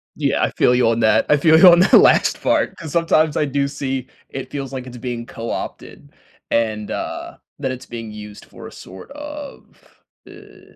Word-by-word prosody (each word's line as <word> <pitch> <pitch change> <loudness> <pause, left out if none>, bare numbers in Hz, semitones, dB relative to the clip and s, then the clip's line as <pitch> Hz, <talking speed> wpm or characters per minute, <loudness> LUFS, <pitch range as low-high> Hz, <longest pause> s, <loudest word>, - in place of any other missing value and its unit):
Yeah, - - 0
I - - 0
feel 125 - +2
you 125 -2 +3
on 115 - 0
that, 110 0 +3
I 150 - +5
feel 160 +2 +5
you 185 - +8
on 175 0 +6
that 190 - +2
last - - +5
part, - - 0
'cause 160 -4 -8
sometimes 160 -2 +2
I 150 - +1
do 140 0 -1
see 135 -2 -4 0.2
it 135 -1 -7
feels 135 -2 -6
like 130 -1 -6
it's 125 - -10
being 120 -1 -5
co-opted 115 0 -7 0.4
and, 110 -2 -1
uh, - - -6 0.2
that 130 -2 -2
it's 130 0 -8
being 115 -2 -8
used 105 -1 -11
for - - -12
a - - -12
sort 95 - -13
of, 295 0 -9 0.6
i - - -17
130 Hz, 195 wpm, -19 LUFS, 115-155 Hz, 0.6 s, you